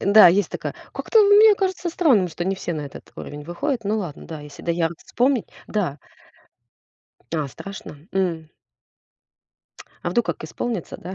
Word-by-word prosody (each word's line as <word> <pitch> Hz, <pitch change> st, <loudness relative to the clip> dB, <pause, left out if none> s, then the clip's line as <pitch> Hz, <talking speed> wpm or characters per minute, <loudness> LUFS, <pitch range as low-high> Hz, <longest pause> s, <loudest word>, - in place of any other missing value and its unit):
Да, 205 Hz, 0 st, +8 dB
есть 195 Hz, +4 st, +2 dB
такая. -, -, -4 dB, 0.2 s
Как-то 450 Hz, -, +3 dB
мне 415 Hz, +1 st, +8 dB
кажется 375 Hz, -2 st, -1 dB
странным, 280 Hz, -, +3 dB
что 175 Hz, +1 st, -4 dB
не 195 Hz, +1 st, 0 dB
все 175 Hz, -, -3 dB
на 155 Hz, -2 st, -3 dB
этот 140 Hz, -, -10 dB
уровень 145 Hz, 0 st, -7 dB
выходят. 225 Hz, -, -2 dB
Ну 215 Hz, +2 st, +1 dB
ладно, 170 Hz, -8 st, -6 dB
да, 160 Hz, -2 st, -7 dB
если 145 Hz, -1 st, -11 dB
доярок 170 Hz, -1 st, 0 dB
вспомнить. 250 Hz, -1 st, +1 dB, 0.2 s
Да. 175 Hz, -9 st, -1 dB, 1.4 s
А, 150 Hz, -3 st, -1 dB
страшно? 195 Hz, +1 st, -9 dB, 0.2 s
М. 170 Hz, -5 st, -1 dB, 1.5 s
А 175 Hz, -, -1 dB
вдруг 235 Hz, +5 st, +1 dB
как -, -, -3 dB
исполнится, 225 Hz, -8 st, -4 dB
да, 185 Hz, +2 st, -7 dB
190 Hz, 155 wpm, -23 LUFS, 165-240 Hz, 1.5 s, Да